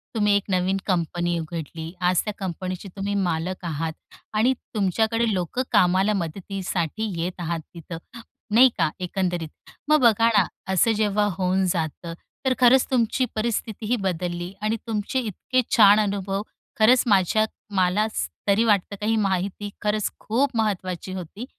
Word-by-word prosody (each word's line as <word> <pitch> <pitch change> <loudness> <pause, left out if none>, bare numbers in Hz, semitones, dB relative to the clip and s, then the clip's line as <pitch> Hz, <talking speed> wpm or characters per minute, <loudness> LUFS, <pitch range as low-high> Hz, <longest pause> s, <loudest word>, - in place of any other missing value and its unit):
तुम्ही 210 -2 +3
एक 200 - +2
नवीन 185 +1 +1
कंपनी 175 -1 0
उघडली. 160 0 -6
आज 180 0 +3
त्या 210 - -2
कंपनीचे 185 +1 -5
तुम्ही 200 +1 -2
मालक 180 -1 -1
आहात 160 0 -2 0.4
आणि 230 +5 +3 0.2
तुमच्याकडे 220 +3 +1
लोक 180 +6 -2
कामाला 185 +3 +4
मदतीसाठी 190 +2 -3
येत 180 +1 -4
आहात 170 -1 -2
तिथं, 165 0 -8 0.5
नाही 245 +5 +7
का - - +2
एकंदरीत? 180 -3 -2 0.4
मग 305 0 +5
बघा 230 -2 +5
ना, 190 - +5 0.3
असं 210 +5 +4
जेव्हा 210 -1 +2
होऊन 185 +1 +1
जातं, 165 0 -3 0.3
तर 260 - +3
खरंच 255 +1 +6
तुमची 245 0 +2
परिस्थितीही 220 +1 -1
बदलली 180 -2 -3
आणि 215 +1 0
तुमचे 215 +4 -1
इतके 255 +3 -1 0.2
छान 205 -1 +8
अनुभव 200 -1 -1 0.4
खरंच 240 +3 +6
माझ्या 205 +2 +3 0.3
मला 185 +3 +3 0.4
तरी 200 +3 +4
वाटतं 205 -2 +2
काही 220 +2 +1
माहिती 200 0 -1
खरंच 210 0 0
खूप 255 +6 +1
महत्त्वाची 185 -4 -2
होती 190 +6 -7
195 Hz, 140 wpm, -24 LUFS, 180-215 Hz, 0.5 s, छान